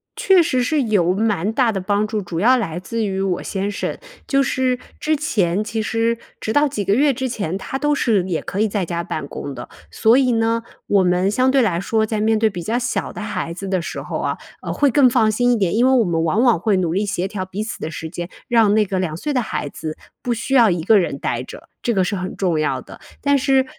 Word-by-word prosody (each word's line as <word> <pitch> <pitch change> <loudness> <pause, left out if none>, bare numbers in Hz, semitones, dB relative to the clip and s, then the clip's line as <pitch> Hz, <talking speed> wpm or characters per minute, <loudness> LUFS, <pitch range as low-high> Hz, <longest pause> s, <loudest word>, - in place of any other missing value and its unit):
确 375 -3 +4
实 260 -6 +1
是 285 +2 +1
有 195 -6 +2
蛮 210 -1 0
大 235 -1 +2
的 195 -3 -3
帮 205 +2 +1
助， 215 -1 -2
主 175 -2 -5
要 245 +7 +5
来 175 -8 -2
自 230 +4 -3
于 195 -2 -2
我 190 -2 -1
先 200 +1 -3
生。 - - -3 0.3
就 275 -1 +3
是 255 -1 0 0.2
之 310 0 +1
前， 210 - 0
其 220 0 -3
实 230 +1 0 0.2
直 220 - -3
到 290 0 +4
几 215 -7 -3
个 200 - +2
月 280 +4 +4
之 260 +1 -2
前， 195 -7 -3
他 270 +7 -5
都 295 0 +1
是 215 -9 +2
也 175 -4 -2
可 195 - -4
以 220 - +3
在 200 -3 -2
家 170 0 -3
办 155 -4 -4
公 140 -1 -6
的， - - -8 0.2
所 225 +1 +3
以 255 -3 +2
呢， 230 0 +1 0.2
我 200 -2 +3
们 180 +2 +2
相 255 +4 +2
对 265 -1 +4
来 175 -6 +1
说， 220 +3 +1
在 215 -1 -2
面 220 0 +3
对 220 0 +3
比 180 -4 -4
较 225 +7 -1
小 245 0 -2
的 - - -7
孩 185 -5 -3
子 195 +1 -6
的 185 -2 0
时 - - -5
候 - - -4
啊， - - -2 0.2
呃， - - -4
会 285 -2 +2
更 260 -1 +5
放 225 -3 +3
心 245 +3 +2
一 240 - +4
点。 190 -3 0
因 245 +3 +4
为 - - +4
我 245 -5 +4
们 165 -2 0
往 190 +9 +2
往 235 -9 +4
会 205 0 +1
努 170 -3 0
力 200 - +1
协 195 -3 -2
调 195 -1 -4
彼 190 +3 -5
此 230 +2 -6
的 155 - -4
时 160 0 -6
间， 175 +1 -6 0.2
让 225 -4 +4
那 215 -1 +3
个 190 -1 -2
2 165 -4 -2
岁 295 +9 -3
的 250 - +2
孩 215 - -3
子， 155 +2 -6 0.2
不 245 - -2
需 245 +4 -4
要 235 -5 +6
一 175 -2 -1
个 210 +2 +5
人 140 -6 -2
呆 120 -3 -2
着， 125 - -11
这 240 - 0
个 190 - +3
是 200 +3 -1
很 185 -1 -4
重 175 -5 +1
要 155 - 0
的。 - - -13 0.2
但 285 0 +2
是 265 0 +2
215 Hz, 275 characters per minute, -20 LUFS, 185-245 Hz, 0.3 s, 要